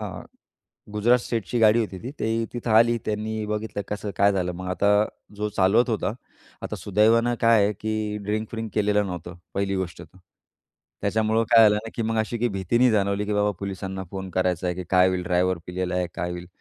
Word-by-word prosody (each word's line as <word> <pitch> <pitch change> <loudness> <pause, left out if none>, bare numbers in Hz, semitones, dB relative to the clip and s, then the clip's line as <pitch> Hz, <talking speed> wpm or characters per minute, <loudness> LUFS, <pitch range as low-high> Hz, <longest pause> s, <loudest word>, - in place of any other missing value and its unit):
हां, - - -6 0.7
गुजरात 120 +4 +4
स्टेटची 115 +1 -2
गाडी 110 +1 +5
होती 100 -4 -4
ती. 125 - -5
ते 115 +1 0
तिथं 120 -1 -4
आली. 115 +2 +5
त्यांनी 110 0 -2
बघितलं 105 -1 -3
कसं 105 0 -4
काय 100 +1 +4
झालं. 90 -2 -1
मग 90 +1 -7
आता 100 +2 +1 0.5
जो 105 0 -2
चालवत 110 +7 +4
होता, 110 -1 -1 0.5
आता - - -4
सुदैवानं 115 +4 +3
काय 115 -2 +5
आहे, 105 - +1
की 110 0 -3
ड्रिंक-व्रिंक 110 +1 -3
केलेलं 105 -1 +2
नव्हतं 90 -1 -7 0.2
पहिली 100 0 -1
गोष्ट 95 -2 -4
तर. 95 - -16 0.8
त्याच्यामुळं 110 +2 +1
काय 115 -1 +8
झालं 105 - +2
ना, - - -6
की 115 - -2
मग 115 0 -1
अशी 110 +2 -1
काही 120 +1 +1
भीती 95 +4 0
नाही 125 0 +5
जाणवली, 100 -1 +1
की 105 - -1
बाबा 105 0 +2
पोलिसांना 95 -1 -5
फोन 95 -1 -6
करायचा 90 -1 0
आहे, 90 - 0
की 90 - -5
काय 90 0 +5
होईल? 90 -1 -1
ड्रायव्हर 90 0 +1
पिलेला 90 0 -3
आहे 90 -1 0
काय 90 - -3
होईल? 90 0 -6
105 Hz, 200 wpm, -24 LUFS, 95-110 Hz, 0.8 s, काय